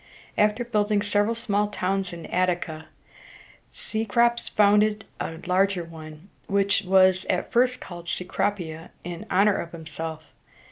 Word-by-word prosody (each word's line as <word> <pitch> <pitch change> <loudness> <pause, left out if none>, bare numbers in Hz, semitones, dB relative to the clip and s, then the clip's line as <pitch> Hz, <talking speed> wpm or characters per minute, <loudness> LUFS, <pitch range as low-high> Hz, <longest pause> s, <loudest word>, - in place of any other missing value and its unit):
After 210 +3 +2
building 210 -3 +1
several 205 +2 +1
small 210 -2 0
towns 195 -1 -2
in 170 -1 -8
At´ti 180 -1 +1
ca, 160 0 -7 0.9
Cecrops 235 +2 0
founded 210 +1 +3
a 160 - -4
larger 185 0 +2
one, 160 +1 -11 0.2
which 200 0 +2
was 185 -1 +4
at 180 - 0
first 250 +1 +3
called 175 -1 -8
Ce - - -2
cro´pi 180 -3 -1
a 165 +2 -12
in 175 -1 -7
honor 200 +2 +4
of 170 - -6
himself. 160 -1 -6
195 Hz, 140 wpm, -25 LUFS, 170-210 Hz, 0.9 s, was